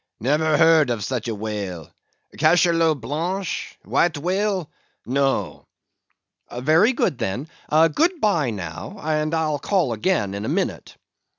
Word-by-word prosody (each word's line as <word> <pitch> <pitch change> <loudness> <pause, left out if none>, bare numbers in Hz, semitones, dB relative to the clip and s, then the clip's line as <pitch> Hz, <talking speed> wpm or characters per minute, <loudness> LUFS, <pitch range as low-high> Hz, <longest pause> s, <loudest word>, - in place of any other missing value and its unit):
"Never 150 +5 +2
heard 160 -4 +5
of 115 -4 -2
such 120 +1 -3
a 115 - -2
whale. 100 -6 -5 0.4
Cachalot 165 -1 +3
Blanche! 170 - -3
White 170 -3 +1
Whale—no." 145 - -2 0.9
"Very 160 - +4
good, 140 - 0
then; 115 +6 -3 0.2
good 165 - +3
bye 170 - +1
now, 100 - -7
and 155 +1 0
I'll 155 -2 0
call 175 - 0
again 110 - 0
in 100 +1 -4
a - - -3
minute." - - -3
155 Hz, 120 wpm, -22 LUFS, 115-170 Hz, 0.9 s, heard